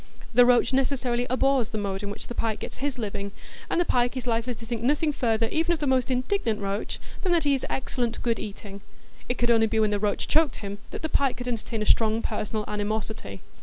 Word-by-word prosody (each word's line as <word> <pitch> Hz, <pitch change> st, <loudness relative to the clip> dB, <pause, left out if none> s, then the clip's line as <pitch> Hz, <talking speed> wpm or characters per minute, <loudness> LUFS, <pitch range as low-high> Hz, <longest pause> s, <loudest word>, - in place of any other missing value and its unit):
The 245 Hz, +1 st, +7 dB
roach 245 Hz, 0 st, +4 dB
necessarily 255 Hz, -2 st, +1 dB
abhors 260 Hz, -2 st, +2 dB
the 220 Hz, -, -4 dB
mode 200 Hz, -2 st, -2 dB
in 205 Hz, -, -4 dB
which 205 Hz, -, -6 dB
the -, -, -6 dB
pike 225 Hz, -2 st, -1 dB
gets -, -, -7 dB
his 275 Hz, -1 st, -2 dB
living, 200 Hz, -3 st, -4 dB, 0.4 s
and -, -, +1 dB
the 350 Hz, -, +3 dB
pike 245 Hz, -1 st, +1 dB
is 255 Hz, -, -4 dB
likely 235 Hz, +1 st, 0 dB
to 230 Hz, 0 st, -10 dB
think 230 Hz, -1 st, -3 dB
nothing 295 Hz, +5 st, +2 dB
further 225 Hz, -3 st, +1 dB
even 330 Hz, +2 st, +2 dB
of 330 Hz, -, -3 dB
the 295 Hz, -, -1 dB
most 260 Hz, -2 st, +2 dB
indignant 255 Hz, -, 0 dB
roach 200 Hz, +1 st, -3 dB, 0.2 s
than 370 Hz, -, 0 dB
that 335 Hz, -, +3 dB
he 285 Hz, -1 st, +3 dB
is 270 Hz, -, -1 dB
excellent 245 Hz, -3 st, -2 dB
good 230 Hz, -2 st, +1 dB
eating; 200 Hz, -1 st, -7 dB, 0.5 s
it 245 Hz, -, 0 dB
could 240 Hz, 0 st, +3 dB
only 225 Hz, -1 st, +4 dB
be 220 Hz, 0 st, 0 dB
when 215 Hz, -1 st, +3 dB
the 205 Hz, -, +1 dB
roach 205 Hz, 0 st, 0 dB
choked 315 Hz, -1 st, +3 dB
him 200 Hz, -1 st, -6 dB
that -, -, -7 dB
the -, -, +1 dB
pike 275 Hz, -5 st, +1 dB
could 245 Hz, 0 st, -6 dB
entertain 230 Hz, -2 st, -2 dB
a -, -, -3 dB
strong 220 Hz, +1 st, +3 dB
personal 215 Hz, -1 st, -2 dB
animosity. 210 Hz, -, -3 dB
235 Hz, 235 wpm, -26 LUFS, 215-260 Hz, 0.5 s, The